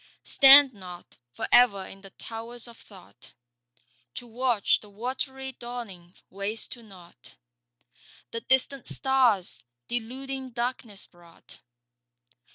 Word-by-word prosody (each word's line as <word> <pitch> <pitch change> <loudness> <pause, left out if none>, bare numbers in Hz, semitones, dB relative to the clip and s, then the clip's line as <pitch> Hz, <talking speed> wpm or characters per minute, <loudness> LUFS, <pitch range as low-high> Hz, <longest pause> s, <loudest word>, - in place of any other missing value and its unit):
Stand 275 -1 +7
not 180 -3 -12 0.2
for - - -5
ever 205 -6 +5
in 195 - -13
the 195 - -12
towers 230 +4 -8
of 235 - -13
Thought 190 -4 -17 0.8
To 245 - -7
watch 240 -2 +1
the 210 - -16
watery 265 +5 -4
dawning 230 -8 -9 0.2
waste 200 +3 -1
to 240 - -8
nought 185 -6 -17 1.0
The 230 - -4
distant 265 +1 +1
stars 255 -9 +2 0.3
deluding 260 +2 -5
darkness 235 -4 -4
brought. 170 -1 -19
235 Hz, 110 wpm, -27 LUFS, 195-255 Hz, 1.0 s, Stand